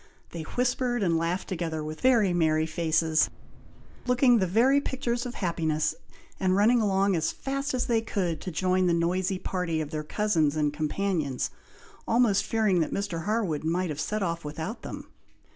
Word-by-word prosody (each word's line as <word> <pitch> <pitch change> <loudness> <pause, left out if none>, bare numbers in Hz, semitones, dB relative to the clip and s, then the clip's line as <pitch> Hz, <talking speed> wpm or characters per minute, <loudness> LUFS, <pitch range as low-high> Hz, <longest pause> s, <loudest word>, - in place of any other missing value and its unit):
They 170 - -5
whispered 245 +4 -1
and 170 -3 +2
laughed 170 +3 -1
together 165 -4 -3
with 155 +1 -7
very 230 -8 +4
merry 160 -2 +2
faces, 160 -1 +1 0.8
looking 250 -1 +4
the 190 - +1
very 250 +9 +4
pictures 250 -3 -2
of 245 - -7
happiness, 160 -4 0 0.5
and 185 -1 +2
running 225 +4 +4
along 195 -2 +2
as 160 -1 0
fast 275 0 -3
as 250 - 0
they 230 -2 +1
could 185 -7 -2
to - - -4
join 185 +2 +1
the 170 - +3
noisy 180 +3 0
party 180 -3 -2
of 150 -2 -4
their 155 -1 -3
cousins 160 -4 +1
and 150 -1 0
companions, 155 -2 -1 0.6
almost 225 -4 +3
fearing 215 -5 +1
that 160 - 0
Mr. 180 -5 -3
Harwood 205 -9 -1
might 170 +1 0
have 150 +1 -4
set 215 -1 -2
off 170 -2 -2
without 160 +9 -5
them. - - -7
185 Hz, 170 wpm, -27 LUFS, 160-220 Hz, 0.8 s, very